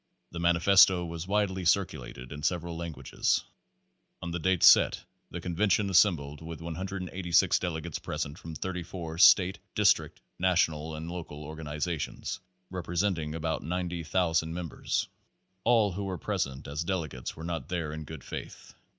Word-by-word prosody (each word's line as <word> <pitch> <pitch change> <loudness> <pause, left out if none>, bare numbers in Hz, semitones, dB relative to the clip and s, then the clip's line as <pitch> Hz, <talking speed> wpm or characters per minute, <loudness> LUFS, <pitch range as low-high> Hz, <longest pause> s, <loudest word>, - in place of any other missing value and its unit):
The 85 - -6
Manifesto 90 +1 +5
was 85 +1 -6
widely 95 -2 0
circulated 75 -9 -1
in 75 0 -7
several 85 +1 -1
lan 85 0 -4
guages. - - 0 0.8
On 85 - -5
the 90 - -2
date 90 +1 +1
set - - +7 0.3
the 85 - -6
convention 100 +3 +1
assembled 80 -6 +3
with 80 -1 -7
186 90 +1 0
delegates 85 -2 -3
present 70 +2 -4
from 80 -1 -8
34 85 -2 -5
state, 95 0 +6 0.2
district, - - +3 0.2
national 80 -4 +1
and 80 +2 -6
local 80 -4 -7
organizations 75 +1 -4 0.3
representing 85 -3 -1
about 80 0 -2
90,000 85 -1 0
members. 85 -1 -2 0.6
All 115 -4 +4
who 100 +2 -4
were 95 -2 -3
present 70 -3 -3
as 75 +3 -3
delegates 80 -9 -3
were 80 - -9
not 85 +1 -4
there 80 -4 -2
in 80 0 -5
good 75 -3 -9
faith. - - -8
85 Hz, 140 wpm, -29 LUFS, 80-90 Hz, 0.8 s, set